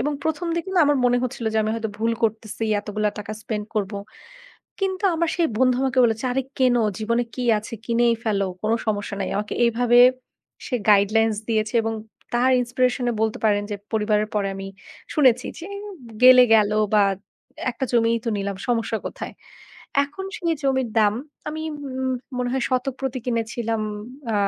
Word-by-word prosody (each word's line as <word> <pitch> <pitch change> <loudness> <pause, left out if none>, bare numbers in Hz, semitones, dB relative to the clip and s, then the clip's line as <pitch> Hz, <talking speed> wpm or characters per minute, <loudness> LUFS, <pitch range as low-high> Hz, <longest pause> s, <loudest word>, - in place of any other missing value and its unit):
এবং 295 +5 0
প্রথমদিকে 335 +3 -2
না 355 - +5
আমার 290 -1 +3
মনে 245 0 +3
হচ্ছিল 250 -1 -4
যে, - - +3
আমি 215 - -1
হয়তো 225 -1 -3
ভুল 225 +1 +1
করতেসি, 225 0 -1 0.2
এতগুলা 210 0 -1
টাকা 210 +1 -5
spend 210 -2 -3
করব। 205 -1 -1 0.9
কিন্তু 385 0 -1
আমার 335 0 0
সেই 340 -2 +2
বন্ধু 255 -1 +4
আমাকে 265 -1 0
বলেছে, 225 +1 0
আরে 270 +1 0 0.2
কিন, 255 -2 +4 0.2
জীবনে 235 +2 0
কী 255 - -4 0.2
আছে, 210 - -10
কিনেই 235 0 +3
ফেলো, 200 -3 +1 0.2
কোনো 220 +1 +2
সমস্যা 205 -1 -1
নাই। 195 - -1
আমাকে 210 +1 -3
এইভাবে 240 +1 +3 0.7
সে 255 - 0
গাইডলাইনস 215 +2 +4
দিয়েছে 220 0 0
এবং 225 0 -2 0.4
তার 245 +2 +3
ইনস্পিরেশনে 245 0 0
বলতে 220 -1 0
পারেন 205 -1 +3
যে 205 - -2 0.2
পরিবারের 210 -1 +1
পরে 200 -2 +1
আমি 195 0 -6 0.5
শুনেছি 255 -5 +4
যে, 330 - -8 0.6
গেলে 255 0 +9
গেল 210 -2 +4 0.2
বা 205 - +6 0.7
একটা 255 - -3
জমিই 230 -1 +3
তো - - -2
নিলাম, 200 0 -3
সমস্যা 230 -2 0
কোথায়? - - -6 0.7
এখন 295 +7 -8
সেই 340 -5 0
জমির 265 -3 +1
দাম 210 -1 +4 0.3
আমি 310 +1 -4 0.3
উম 260 0 -2 0.3
মনে 245 - 0
হয় 265 - 0
শতক 255 0 0
প্রতি 265 -1 -2
কিনেছিলাম 230 -1 -1 0.5
আ - - 0
235 Hz, 165 wpm, -23 LUFS, 215-260 Hz, 0.9 s, গেলে